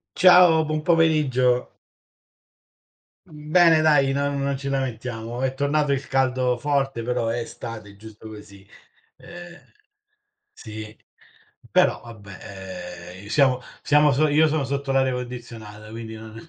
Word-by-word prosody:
Ciao, 180 Hz, -2 st, +6 dB
buon 155 Hz, 0 st, -2 dB
pomeriggio. 150 Hz, -7 st, +2 dB, 1.6 s
Mhmm, 150 Hz, 0 st, -12 dB
bene 165 Hz, -3 st, +6 dB
dai 150 Hz, -3 st, +3 dB
non 140 Hz, 0 st, -1 dB
non 140 Hz, 0 st, -1 dB
ci 140 Hz, +1 st, -7 dB
lamentiamo. 120 Hz, -3 st, -4 dB
È 130 Hz, 0 st, 0 dB
tornato 145 Hz, +2 st, 0 dB
il 135 Hz, 0 st, -4 dB
caldo 130 Hz, -2 st, 0 dB
forte, 135 Hz, -3 st, -1 dB
però 120 Hz, -1 st, -2 dB
è 115 Hz, +1 st, -2 dB
estate, 115 Hz, -2 st, -8 dB
è -, -, -18 dB
giusto 110 Hz, +1 st, -13 dB
così. 105 Hz, -2 st, -13 dB, 0.5 s
Ehm, 175 Hz, 0 st, -12 dB, 0.9 s
sì. 110 Hz, 0 st, -10 dB, 0.8 s
Però -, -, +2 dB
vabbè, 100 Hz, -5 st, -12 dB, 0.8 s
ehm, 100 Hz, -, -13 dB
i -, -, -11 dB
siamo 130 Hz, -1 st, +2 dB, 0.2 s
siamo 150 Hz, 0 st, +4 dB
so 150 Hz, +4 st, +2 dB
io 155 Hz, +2 st, +3 dB
sono 155 Hz, -2 st, -1 dB
sotto 140 Hz, 0 st, -3 dB
l'aria 135 Hz, -1 st, +2 dB
condizionata, 115 Hz, -4 st, -8 dB
quindi 110 Hz, 0 st, -8 dB
non 110 Hz, 0 st, -11 dB
130 Hz, 135 wpm, -23 LUFS, 115-150 Hz, 1.6 s, Ciao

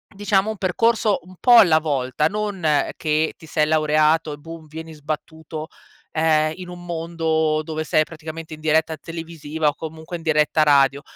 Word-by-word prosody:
diciamo 205 Hz, +1 st, +1 dB
un 220 Hz, -, -7 dB
percorso 215 Hz, +3 st, +1 dB
un 185 Hz, +1 st, -15 dB
po' 245 Hz, -1 st, +6 dB
alla 170 Hz, -8 st, +7 dB
volta. 140 Hz, -2 st, 0 dB
Non 190 Hz, -6 st, 0 dB
che 155 Hz, 0 st, 0 dB
ti 160 Hz, -, -15 dB
sei 155 Hz, -1 st, +1 dB
laureato 155 Hz, 0 st, +2 dB
e -, -, -8 dB
boom, 165 Hz, +1 st, -11 dB
vieni 160 Hz, +1 st, -9 dB
sbattuto, 155 Hz, +1 st, -6 dB, 0.4 s
ehm, 155 Hz, -1 st, +2 dB
in 180 Hz, -1 st, -8 dB
un 175 Hz, 0 st, -10 dB
mondo 160 Hz, -2 st, 0 dB
dove 155 Hz, 0 st, -4 dB
sei 155 Hz, 0 st, +2 dB
praticamente 160 Hz, 0 st, -9 dB
in 155 Hz, -, -9 dB
diretta 160 Hz, 0 st, +1 dB
televisiva 160 Hz, -1 st, -4 dB
o 145 Hz, -, +1 dB
comunque 160 Hz, +2 st, -7 dB
in 165 Hz, -, -13 dB
diretta 155 Hz, -1 st, +3 dB
radio. 140 Hz, -1 st, +4 dB
160 Hz, 165 wpm, -22 LUFS, 155-165 Hz, 0.4 s, alla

